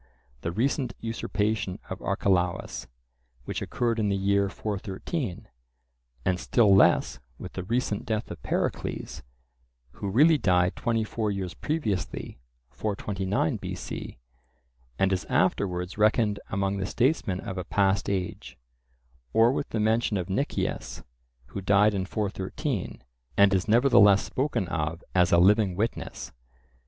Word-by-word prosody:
the 85 - -2
"recent" 125 - 0
usurpation 110 -3 -2
of - - -6
Archelaus, 90 -2 0 0.6
which - - -4
occurred 115 -2 -1
in 105 -2 +1
the 100 - +1
year 100 0 +2
413; 105 - -4 0.8
and 90 -1 +1
still 105 -2 +4
less 65 -9 +4 0.2
with - - -9
the 95 - -4
"recent" 110 +2 -1
death 110 -1 -3
of - - -8
Pericles, - - -3 0.7
who 100 +10 -5
really 150 +9 +5
died 90 -3 +2
twenty 115 -1 0
four 110 0 -2
years 95 -4 -3
previously 110 - -3 0.3
(429 100 - -1
B.C.) - - -6 0.8
and 95 0 +2
is 90 -2 -2
afterwards 90 0 0
reckoned 105 -1 +3
among 100 0 -1
the 95 -1 -2
statesmen 120 - +1
of 95 0 -5
a - - -3
past 95 +2 +1
age; 95 -3 -4 0.8
or 115 +2 +5
with 140 - -2
the 110 - -2
mention 110 0 +2
of 95 +1 -3
Nicias, 135 +9 -2 0.5
who 100 - -5
died 105 +2 +4
in 95 -2 -2
413, 100 - -3 0.3
and 100 0 +6
is 95 0 +1
nevertheless 110 -4 +6
spoken 130 -8 -1
of 80 -1 -3
as 90 -2 +3
a 85 - +6
living 100 +1 +4
witness. 110 +4 -3
100 Hz, 130 wpm, -27 LUFS, 95-110 Hz, 0.8 s, and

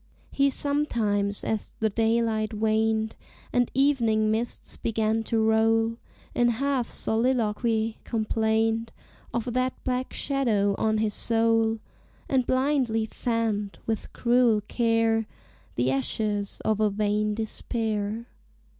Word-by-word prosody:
He 280 0 +3
sometimes, 225 -9 +1
as 220 -2 -3
the 220 -1 +1
daylight 225 0 +1
waned 220 0 +1 0.4
And 245 -1 +2
evening 230 -6 +3
mists 230 +2 -2
began 220 0 0
to 230 - 0
roll, 225 +1 +2 0.4
In 240 - +3
half 260 +1 0
soliloquy 225 -1 0
complained 225 0 0 0.4
Of 235 0 -2
that 255 +1 0
black 255 0 -2
shadow 225 -8 +1
on 220 0 +2
his 215 -1 0
soul, 225 0 +2 0.5
And 260 -3 +1
blindly 255 -4 +1
fanned, 220 -3 -2
with 220 -2 -3
cruel 240 -3 +3
care, 225 -2 +1 0.5
The 125 +2 +1
ashes 205 - -2
of 215 -1 +1
a 215 -1 +3
vain 210 +1 0
despair. 220 0 -3
225 Hz, 110 wpm, -26 LUFS, 215-235 Hz, 0.5 s, He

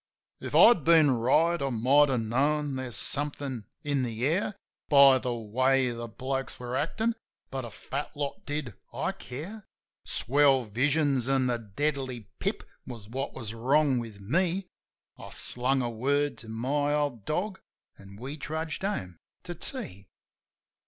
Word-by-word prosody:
If - - -5
I'd 230 -10 +7
been 160 -2 +6
right, 140 +8 +2
I 140 - 0
might 135 +5 +4
have 125 -3 +1
known 140 +5 0
there's 130 -3 -2
somethin' 140 -5 -1 0.2
in 145 -2 0
the 120 -1 -2
air 185 +7 0 0.3
By 140 -2 +7
the 125 -1 -2
way 130 +3 +1
the 120 0 -5
blokes 135 +3 -4
were 125 0 -4
actin'; 220 - 0 0.4
but 130 -2 -3
a - - -7
fat 140 +7 -6
lot 140 -1 -4
did 145 -6 -4 0.2
I - - -1
care. 170 - -8 0.4
Swell 135 -1 +3
visions 135 +3 +1
an' 135 -1 +2
the 120 -2 0
deadly 130 +3 -2 0.2
pip - - -2 0.2
was 115 -5 -8
what 135 +4 -4
was 115 -4 -6
wrong 135 +3 +2
with 110 -4 -8
me. 175 - 0 0.5
I - - -9
slung 130 +2 0
a 120 - -1
word 140 +5 0
to 115 - -11
my 145 +6 0
old 145 -7 -1
dog, 190 +5 -2 0.4
an' 100 0 -13
we 130 +8 -7
trudged 160 +1 -4
home 95 - -3 0.3
to 175 - -6
tea. 175 - -6
135 Hz, 150 wpm, -28 LUFS, 120-150 Hz, 0.5 s, I'd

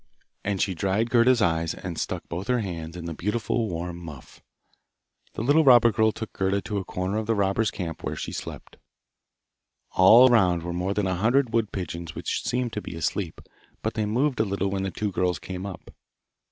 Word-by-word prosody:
And 100 -1 -1
she 95 - +1
dried 100 +6 0
Gerda's 120 -1 +4
eyes, 80 -2 0
and 90 -2 -6
stuck - - -4
both 90 +5 -5
her 125 -2 +2
hands 85 -4 -6
in 85 - -7
the 85 - -4
beautiful 110 +5 -1
warm 85 0 -4
muff. 75 -7 -11 0.9
The - - -4
little 145 +6 +4
robber 120 -4 +7
girl 110 +1 +3
took 110 0 -7
Gerda 95 +1 0
to 105 -2 -2
a - - -4
corner 90 +3 -3
of 110 -1 -3
the 115 - +2
robbers' 100 +2 +1
camp 85 -4 -6
where - - -3
she - - -5
slept. - - -8 1.1
All 115 +7 +8
round 90 -8 +3
were 85 0 -4
more 90 +3 -2
than 105 - 0
a 95 - 0
hundred 115 +6 +2
wood 115 -3 +1
pigeons 85 -3 -5
which - - -2
seemed 125 -1 -1
to 105 - -3
be - - -7
asleep, 80 +1 -3 0.4
but 110 - -1
they 110 -2 -1
moved 125 +4 0
a - - +4
little 100 -1 -1
when 95 -1 -1
the 95 - -1
two 105 +3 -3
girls 90 -1 0
came 95 +1 -6
up. 90 -4 -10
100 Hz, 205 wpm, -25 LUFS, 90-115 Hz, 1.1 s, All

